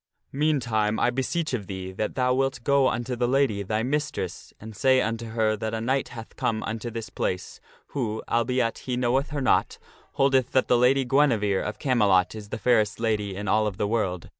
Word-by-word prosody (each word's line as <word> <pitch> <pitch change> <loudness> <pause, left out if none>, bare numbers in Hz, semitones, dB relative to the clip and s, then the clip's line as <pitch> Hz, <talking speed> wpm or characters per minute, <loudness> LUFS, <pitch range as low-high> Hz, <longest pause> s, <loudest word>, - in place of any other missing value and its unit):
Meantime, 120 -8 +1
I 120 - +2
beseech 145 +5 -2
of 105 -6 -3
thee, 95 -1 -6
that 105 +3 -3
thou 125 0 +2
wilt 135 -2 -1
go 140 -1 +3
unto 120 +1 -2
the 120 0 0
lady, 130 -6 +1
thy 110 +3 -1
mistress, 135 - -3
and 110 0 -10
say 130 +5 +4
unto 115 0 -2
her 110 -1 +1
that 110 +1 -3
a - - -2
knight 130 +4 0
hath 115 -1 -10
come 110 -1 -1
unto 115 +2 -4
this 115 -1 -6
place, 90 0 -3 0.3
who, 110 -6 -3
albeit 120 0 0
he 125 -1 -3
knoweth 130 +3 +1
her 145 -2 -3
not, 130 - +2 0.4
holdeth 135 -2 +2
that 130 - +3
the - - +4
Lady 130 +2 +3
Guinevere 120 -8 +2
of 105 - -4
Camelot 100 - +2
is 105 -2 -9
the 110 - -4
fairest 110 -4 +2
lady 105 -4 -1
in 105 +1 -5
all 110 0 +2
of 100 -2 -4
the 105 - 0
world. 100 -6 -2
115 Hz, 200 wpm, -25 LUFS, 105-130 Hz, 0.4 s, say